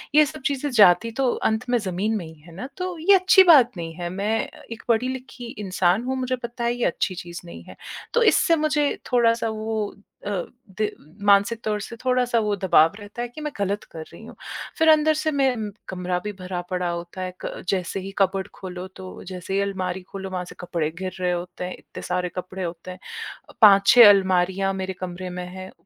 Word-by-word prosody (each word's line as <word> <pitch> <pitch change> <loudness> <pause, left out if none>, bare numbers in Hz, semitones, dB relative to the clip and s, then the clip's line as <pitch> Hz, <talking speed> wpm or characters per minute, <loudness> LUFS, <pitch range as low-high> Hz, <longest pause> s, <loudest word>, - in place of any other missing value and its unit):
ये 305 0 +8
सब 295 +1 -8
चीज़ें 285 +1 0
जाती 220 0 +5
तो 260 - +3 0.2
अंत 220 +3 -2
में 245 - +3
ज़मीन 205 +2 -1
में 175 - -5
ही 160 - -11
हैं 170 +2 -15
ना, 250 +10 -6
तो 365 -1 -3
ये 390 +5 +5
अच्छी 375 0 +6
बात 295 -9 +7
नहीं 165 -1 -5
है। 175 0 -4
मैं 205 +5 -1 0.3
एक 230 - -7
पढ़ी-लिखी 255 +2 -1
इंसान 190 0 +1
हूँ, 260 +1 -2
मुझे 255 0 -1
पता 240 0 -6
है 235 0 +1
ये 245 - -1
अच्छी 185 - -1
चीज़ 175 0 -7
नहीं 170 - -10
है। - - -13 0.4
तो 475 - +4
इससे 335 -3 +4
मुझे 300 -2 +1
थोड़ा-सा 230 -2 +3
वो 220 -1 -3 0.3
अ, - - -2 0.5
दि 215 -1 +1 0.4
मानसिक 205 +3 +4
तौर 210 -1 -1
से 230 - -7
थोड़ा-सा 250 -2 +2
वो 210 -1 +1
दबाव 175 -4 +4
रहता 205 +3 -8
है 240 - -2
कि 275 +6 -10
मैं 300 0 -3
गलत 200 +1 -1
कर 160 - -7
रही - - -12
हूँ। - - -12 0.4
फिर 320 0 +4
अंदर 310 0 +5
से 310 0 -1
मे 275 -2 +3 0.4
कमरा 180 -1 -2
भी 210 - -3
भरा 180 -1 -4
पड़ा 180 -1 0
होता 170 +2 -5
है, 185 0 -4
क - - -6
जैसे 190 0 -1
ही 195 +1 -7
कबर्ड 190 -1 +1
खोलो 185 -1 -7
तो 185 -1 -9
जैसे 185 0 -6
ही 195 - +2
अलमारी 190 -2 -2
खोलो, 190 +1 -7
वहाँ 185 -1 -3
से - - -12
कपड़े 170 -3 -2
गिर 185 0 -4
रहे 180 -1 +1
होते 175 +1 -4
हैं, 180 - -4
इतने - - -11
सारे 180 0 -1
कपड़े 185 +1 -5
होते 170 +1 -6
हैं। 185 - -10 0.5
अ, - - -14
5-6 205 +2 +9
अलमारियाँ 190 0 +3
मेरे 190 0 -3
कमरे 185 0 -5
में 180 0 -5
हैं। 185 +1 -9
200 Hz, 210 wpm, -24 LUFS, 180-245 Hz, 0.5 s, 5-6